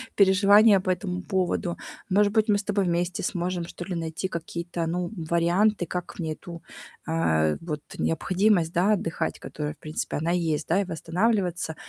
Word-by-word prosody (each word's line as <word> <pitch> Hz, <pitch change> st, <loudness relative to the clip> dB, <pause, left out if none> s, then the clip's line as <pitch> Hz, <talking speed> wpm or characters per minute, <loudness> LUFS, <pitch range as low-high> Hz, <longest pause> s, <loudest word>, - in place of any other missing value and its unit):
переживания 200 Hz, +1 st, +6 dB
по 185 Hz, 0 st, -1 dB
этому 180 Hz, -1 st, -3 dB
поводу. 185 Hz, -2 st, -1 dB, 0.3 s
Может 205 Hz, +2 st, +3 dB
быть, 220 Hz, 0 st, +3 dB
мы -, -, +5 dB
с -, -, -4 dB
тобой 200 Hz, -2 st, 0 dB
вместе 175 Hz, +1 st, -1 dB
сможем, 175 Hz, -1 st, -2 dB
что 175 Hz, -, -8 dB
ли, 185 Hz, -2 st, -4 dB
найти 165 Hz, +3 st, -3 dB
какие-то, 170 Hz, 0 st, -4 dB
ну, 175 Hz, +2 st, -2 dB, 0.2 s
варианты, 175 Hz, +3 st, +2 dB
как 180 Hz, +1 st, -5 dB
мне 160 Hz, -2 st, -2 dB
эту, 170 Hz, +1 st, -10 dB, 0.5 s
а, -, -, -3 dB, 0.4 s
э, -, -, -8 dB
вот 150 Hz, -3 st, -4 dB, 0.2 s
необходимость, 180 Hz, +1 st, +1 dB
да, 195 Hz, +5 st, +3 dB
отдыхать, 165 Hz, -4 st, -2 dB
которая, 150 Hz, -1 st, -5 dB
в -, -, -26 dB
принципе, 155 Hz, -1 st, -4 dB
она 165 Hz, +3 st, -1 dB
есть, 160 Hz, -4 st, 0 dB
да, 185 Hz, +5 st, +3 dB
и -, -, -2 dB
восстанавливаться. 175 Hz, 0 st, -1 dB
180 Hz, 170 wpm, -26 LUFS, 165-195 Hz, 0.5 s, переживания